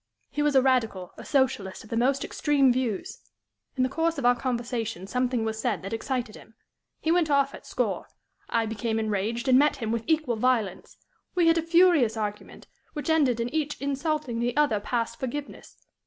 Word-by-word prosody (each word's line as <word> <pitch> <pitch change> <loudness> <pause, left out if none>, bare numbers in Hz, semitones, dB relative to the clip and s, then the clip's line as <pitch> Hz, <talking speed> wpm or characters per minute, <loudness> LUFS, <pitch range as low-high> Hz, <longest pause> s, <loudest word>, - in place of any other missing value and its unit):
He 295 - -2
was 295 -1 +2
a 265 - +6
Radical, 225 -9 0
a - - -10
Socialist 240 -9 0
of 220 - -16
the - - -1
most 265 +4 +2
extreme 280 -4 +2
views. 240 -6 -3 0.6
In 255 - +1
the - - +3
course 325 +4 -1
of 275 - -2
our 245 0 +5
conversation 235 -6 -3
something 250 +1 0
was 220 0 -3
said 215 -7 -1
that 195 +3 -5
excited 240 -1 -3
him. 225 - -15 0.4
He 320 - 0
went 340 -2 +2
off 280 -1 +2
at - - -11
score. - - -2 0.4
I 230 -1 +1
became 220 +1 -2
enraged, 220 +3 -2
and 255 0 +6
met 295 +1 +3
him 225 -3 -3
with 230 -1 -1
equal 310 -8 +1
violence. 225 -5 0 0.4
We 355 -2 +3
had 330 0 +4
a - - 0
furious 330 -9 +4
argument, 210 -1 -5 0.3
which 300 +2 -2
ended 275 -7 +3
in 235 +1 -1
each 300 -2 -1
insulting 280 -2 -2
the 240 +2 -1
other 290 -8 +3
past 230 +2 -2
forgiveness. 280 +3 -6
250 Hz, 190 wpm, -26 LUFS, 225-290 Hz, 0.6 s, a